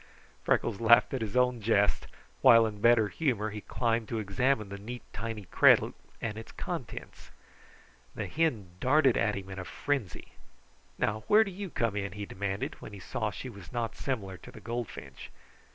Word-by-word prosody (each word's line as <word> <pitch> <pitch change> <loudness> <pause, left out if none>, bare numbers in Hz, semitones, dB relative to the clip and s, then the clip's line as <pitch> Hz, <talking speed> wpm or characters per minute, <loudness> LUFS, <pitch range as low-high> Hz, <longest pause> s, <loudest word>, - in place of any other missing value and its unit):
Freckles 115 -2 +1
laughed 115 +3 +6
at 130 - -1
his 110 +1 -2
own 125 -2 +2
jest, 105 -1 +2 0.3
while 115 -1 +8
in 105 -2 -5
better 115 -2 +5
humor 110 -5 -1
he 105 0 -6
climbed 115 0 -1
to 115 - -3
examine 110 +1 0
the 100 0 -7
neat, 120 +4 -7
tiny 115 -2 -5
cradle - - +5 0.3
and 110 -1 -4
its 115 - -10
contents. - - -6 0.9
The - - -3
hen 125 - -1
darted 135 +1 +4
at 105 - +1
him 95 -1 -6
in 95 - -6
a - - -4
frenzy. 130 - -3 0.7
"Now, 110 +1 -1
where 215 +1 +7
do 195 - -6
you 195 +1 -6
come 115 -8 -1
in?" 100 -1 -3
he 105 0 -5
demanded, 100 0 -4
when - - -9
he 100 - -8
saw 110 +3 -2
that 100 - -10
she - - -6
was 100 -8 -11
not 120 -2 -2
similar 100 -9 -3
to - - -13
the - - -11
goldfinch. 120 -1 -6
110 Hz, 185 wpm, -30 LUFS, 100-125 Hz, 0.9 s, while